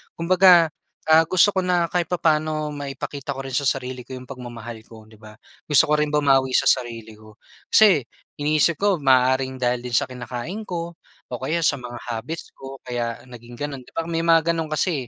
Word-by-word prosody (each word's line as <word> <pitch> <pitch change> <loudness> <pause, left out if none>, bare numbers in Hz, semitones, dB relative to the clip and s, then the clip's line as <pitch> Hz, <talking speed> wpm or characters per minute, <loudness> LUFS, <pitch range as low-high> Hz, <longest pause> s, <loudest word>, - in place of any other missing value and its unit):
Kumbaga, 180 0 +5 0.4
ah, 160 +1 +7
gusto 185 +4 +4
ko - - +2
na 175 -2 +1
kahit 175 -2 0
papaano 155 -3 0
maipakita 140 0 -6
ko 135 - -6
rin 135 -2 -5
sa 140 +1 +1
sarili 130 -1 -2
ko 130 - -7
yung 130 0 -10
pagmamahal 120 -3 -8
ko, 110 -1 -14
'di 110 - -18
ba? 110 -1 -14 0.3
Gusto 145 -4 +4
ko 150 - +1
rin 150 -1 0
bumawi 135 -3 +3
sa - - +3
sarili 115 -4 -2
ko. 110 0 -17 0.4
Si, 195 -10 +6 0.4
iniisip 155 +3 +2
ko 200 -3 +1
maaaring 130 0 +2
dahil 125 -1 0
din 125 -1 -6
sa - - +2
kinakain 125 - -6
ko, 170 -1 -5 0.4
o 125 - -4
kaya 160 +5 -1
sa 145 - +2
mga 125 -1 -8
habits 125 +9 -6
ko 135 0 -10
kaya 120 -2 -3
naging 120 -1 -12
ganun, 145 -2 -5
'di - - -20
ba, 165 - -1
may 165 -1 -1
mga 165 0 +3
ganun 165 -2 -3
kasi 150 -3 -1
135 Hz, 195 wpm, -22 LUFS, 125-165 Hz, 0.4 s, ah